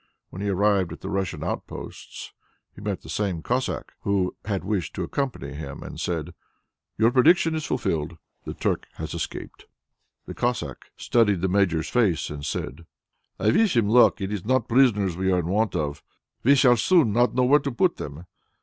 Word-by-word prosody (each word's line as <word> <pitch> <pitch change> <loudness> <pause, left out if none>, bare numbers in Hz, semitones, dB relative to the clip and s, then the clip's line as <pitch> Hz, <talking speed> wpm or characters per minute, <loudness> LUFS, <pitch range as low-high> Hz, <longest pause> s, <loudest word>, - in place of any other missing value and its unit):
When 95 - -7
he 100 - -1
arrived 100 -2 +2
at 80 - -9
the - - -5
Russian 95 -2 -2
outposts, - - -7 0.4
he - - -13
met 100 -2 -3
the - - -12
same 95 -6 -2
Cossack 125 +2 -2
who 100 -2 0
had 100 -3 -2
wished 95 -4 -2
to - - -2
accompany 125 - -3
him 70 -2 -7
and - - -8
said, 85 -1 -3 0.6
"Your 115 +2 +4
prediction 160 +5 +4
is 155 -1 -3
fulfilled. 85 - -2 0.3
The - - -6
Turk - - -1
has - - -6
escaped." - - -6 0.6
The - - -7
Cossack - - -3
studied 105 -7 +2
the 95 - +1
Major's 90 -5 +1
face 100 -13 +1
and 75 -1 -7
said, 80 +2 -5 0.5
"I 110 - +3
wish 205 - +3
him 105 -3 +3
luck. 120 +1 +5
It 95 +1 -3
is 100 -4 -3
not 130 +4 +1
prisoners 110 -8 +3
we 95 +1 0
are 90 - +3
in 90 - -1
want 105 +3 0
of. 75 -1 -2 0.4
We 140 +4 +5
shall 125 -3 +5
soon 140 - +3
not 120 0 +2
know 125 - +3
where 140 +4 +5
to 140 0 -3
put 170 +8 +1
them." 75 +5 -7
100 Hz, 185 wpm, -25 LUFS, 90-125 Hz, 0.6 s, luck